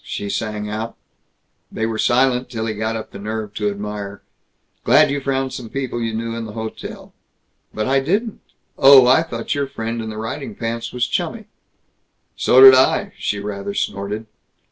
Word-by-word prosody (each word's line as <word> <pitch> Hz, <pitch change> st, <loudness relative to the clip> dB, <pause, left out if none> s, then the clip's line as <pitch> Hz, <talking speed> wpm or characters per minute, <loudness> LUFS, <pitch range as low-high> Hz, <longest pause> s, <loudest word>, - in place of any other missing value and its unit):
she 100 Hz, -, -5 dB
sang 105 Hz, -1 st, -3 dB
out. 110 Hz, +2 st, -5 dB, 0.7 s
They 110 Hz, -, -2 dB
were 110 Hz, -1 st, -3 dB
silent 125 Hz, 0 st, +2 dB
till 110 Hz, -2 st, -4 dB
he 110 Hz, -, -2 dB
got 110 Hz, +2 st, -2 dB
up 110 Hz, -, -6 dB
the -, -, -9 dB
nerve 105 Hz, 0 st, -5 dB
to 105 Hz, -1 st, -1 dB
admire, 100 Hz, 0 st, -6 dB, 0.6 s
"Glad -, -, +5 dB
you 140 Hz, 0 st, -2 dB
found 135 Hz, -1 st, -1 dB
some 120 Hz, -3 st, -7 dB
people 130 Hz, -3 st, -3 dB
you 115 Hz, -1 st, -1 dB
knew 115 Hz, +1 st, -3 dB
in 115 Hz, -1 st, -4 dB
the 105 Hz, -, -8 dB
hotel." 110 Hz, 0 st, -7 dB, 0.6 s
"But 110 Hz, -, -3 dB
I 135 Hz, +1 st, +3 dB
didn't." 200 Hz, -, -1 dB, 0.4 s
"Oh, 135 Hz, -2 st, +9 dB
I 130 Hz, +5 st, +5 dB
thought 165 Hz, -, -4 dB
your 140 Hz, -1 st, -1 dB
friend 115 Hz, -2 st, -4 dB
in 110 Hz, -, -5 dB
the 110 Hz, -, -7 dB
riding 130 Hz, -, -5 dB
pants 115 Hz, -, -4 dB
was 125 Hz, 0 st, 0 dB
chummy." -, -, -3 dB, 0.9 s
"So 130 Hz, -, +4 dB
did 135 Hz, 0 st, +11 dB
I!" 130 Hz, 0 st, +3 dB
She 105 Hz, -, -1 dB
rather 100 Hz, 0 st, -5 dB
snorted. 100 Hz, +3 st, -3 dB
115 Hz, 180 wpm, -20 LUFS, 105-130 Hz, 0.9 s, did